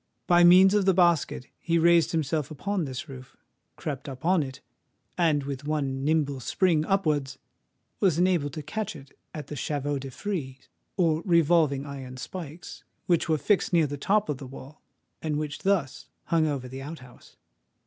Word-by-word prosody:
By 175 0 +5
means 185 +3 +7
of 205 -2 +2
the 190 -2 +4
basket, 170 -8 +2
he 170 -1 0
raised 170 0 +4
himself 155 -3 -1
upon 185 +3 -2
this 130 -1 -6
roof—crept 135 +2 -9
up 135 +3 -9
on 180 -1 +4
it—and 145 +3 -3
with 140 0 -6
one 135 -3 -1
nimble 145 -2 +1
spring 160 +5 +1
upwards 150 -8 0 0.6
was 180 -6 +2
enabled 175 -6 +1
to 155 - -6
catch 210 +6 -4
at 140 +2 -11
the 150 - -7
chevaux 145 0 -2
de 135 0 -7
frise, 135 -4 -5 0.3
or 165 -4 +2
revolving 165 -5 +3
iron 135 -3 -8
spikes, 165 +3 -8 0.2
which 170 -1 +1
were 155 - +3
fixed 195 +4 +1
near 165 -2 +4
the 145 0 -4
top 205 +9 +1
of 145 -3 -3
the 135 - -8
wall, 135 +3 -12 0.4
and 155 -2 -1
which 150 -1 -4
thus 190 -9 -1 0.2
hung 160 -2 +1
over 140 -4 -3
the 130 +1 -8
out 155 +4 -7
house. 125 - -18
155 Hz, 165 wpm, -27 LUFS, 140-175 Hz, 0.6 s, means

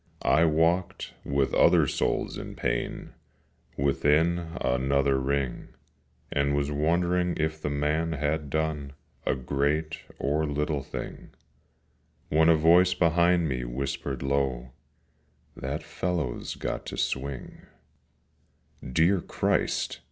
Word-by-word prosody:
I 80 - +5
walked, 80 +3 +1
with 70 -1 0
other - - +5
souls - - -1
in - - -7
pain, - - -3 0.6
Within 80 +5 +1
another 65 +2 +1
ring, 70 -1 -2 0.6
And 70 0 +1
was 70 0 0
wondering 85 +4 +1
if 80 0 -1
the 75 - -2
man 75 +3 0
had 75 0 -1
done 75 -2 -2 0.3
A - - +2
great 70 +4 -1 0.2
or 75 +2 0
little 75 0 -1
thing, - - -7 1.0
When 80 +2 +4
a 85 - +7
voice 90 +3 +5
behind 85 0 +3
me 65 -3 -2
whispered 70 +1 -4
low, 65 -3 -1 0.8
'That 70 +3 -4
fellow's 85 -9 -3
got - - -4
to - - -6
swing.' 70 -1 -4 1.1
Dear 80 +8 +2
Christ! - - -1
75 Hz, 110 wpm, -27 LUFS, 70-80 Hz, 1.1 s, a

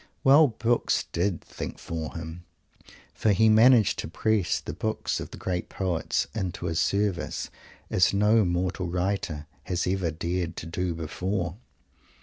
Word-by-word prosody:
Well, 145 +3 +7
books 115 0 +1
did 85 0 0
"think - - -7
for 80 +1 -5
him," 85 +1 -7 0.7
for 110 - +2
he 110 +3 +4
managed 110 -2 +6
to - - -3
press 105 +2 +1
the - - -6
books 110 +7 -2
of - - -6
the - - -10
great 90 -2 -3
poets 90 -4 -1
into 95 -5 -3
his 85 -1 0
service, 100 -3 -1 0.4
as 90 - +4
no 105 +2 +4
mortal 90 0 -1
writer 90 -4 -2 0.2
has 90 0 -1
ever 90 -2 0
dared 85 +2 -2
to - - -5
do 85 +1 -2
before. 90 +3 -3
90 Hz, 145 wpm, -27 LUFS, 85-105 Hz, 0.7 s, Well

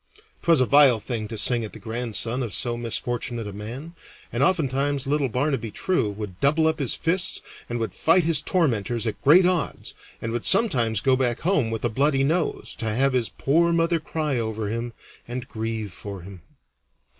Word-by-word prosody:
'Twas 165 -4 +4
a 130 - +4
vile 135 -4 +6
thing 110 -1 -4
to 110 - -6
sing 120 +2 +4
at 110 - -7
the 110 - -9
grandson 115 +2 -2
of 115 -5 -3
so 120 -2 -1
misfortunate 120 0 -2
a 105 - -7
man, 120 +11 -8 0.4
and 120 - -1
oftentimes 140 -3 +1
little 140 -1 0
Barnaby 130 -1 -1
True 175 - 0
would 100 -3 -7
double 155 +3 +2
up 160 0 +1
his 135 -4 +2
fists 175 +2 0 0.3
and 120 - -2
would 115 -1 -3
fight 170 +2 +3
his 160 -2 +2
tormentors 120 - 0
at 110 - -4
great 170 +6 +6
odds, 180 -2 -1 0.3
and 115 - -4
would 120 0 -2
sometimes 120 - +3
go 130 -1 +3
back 125 -2 0
home 160 -9 +1
with 115 0 -3
a - - +2
bloody 135 +4 +1
nose 160 +4 -1
to 115 - -3
have 130 +5 +1
his 125 -3 0
poor 170 +5 +1
mother 165 0 +1
cry 150 -4 -2
over 110 -2 -3
him 115 +2 -4 0.3
and 125 +1 -6
grieve 110 -3 -4
for 100 -1 -8
him. 95 -1 -11
125 Hz, 190 wpm, -24 LUFS, 115-150 Hz, 0.4 s, vile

